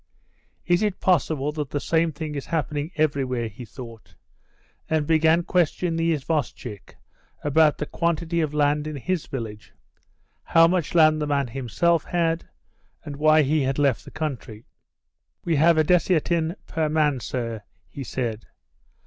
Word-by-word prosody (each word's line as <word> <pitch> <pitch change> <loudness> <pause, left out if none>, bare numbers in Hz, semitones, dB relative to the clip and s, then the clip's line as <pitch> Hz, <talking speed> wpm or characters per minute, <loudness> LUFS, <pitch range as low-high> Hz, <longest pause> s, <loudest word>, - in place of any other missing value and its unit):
"Is 175 +2 +2
it 210 -3 -1
possible 155 -5 +1
that 150 -3 -4
the 145 - -2
same 165 +2 +1
thing 155 0 -6
is 140 -2 -5
happening 150 -2 -2
everywhere?" 135 -6 0
he 110 +3 -10
thought, 115 -2 -12 0.7
and 155 -2 +1
began 160 +2 +3
questioning 175 0 0
the 165 0 +1
isvostchik 130 - -4 0.5
about 150 +1 +3
the 150 - -3
quantity 170 +1 -1
of 155 -2 -1
land 150 0 +1
in 155 - -5
his 175 +4 -2
village, 110 -5 -7 0.7
how 165 0 +5
much 175 -2 -1
land 155 -2 +5
the 150 - -1
man 140 -1 +1
himself 140 +7 0
had, 165 -1 -1 0.6
and 145 -2 -6
why 155 +1 +5
he 150 +2 +1
had 135 0 -1
left 135 -10 +1
the - - -11
country. 130 -8 -5 0.8
"We 165 -3 +1
have 165 +2 +5
a 155 - +5
desiatin 170 0 +1
per 160 -1 -1
man, 150 -3 +1
sir," 115 -1 -4 0.3
he 135 +7 -8
said. 115 -3 -4
150 Hz, 150 wpm, -24 LUFS, 135-165 Hz, 0.8 s, how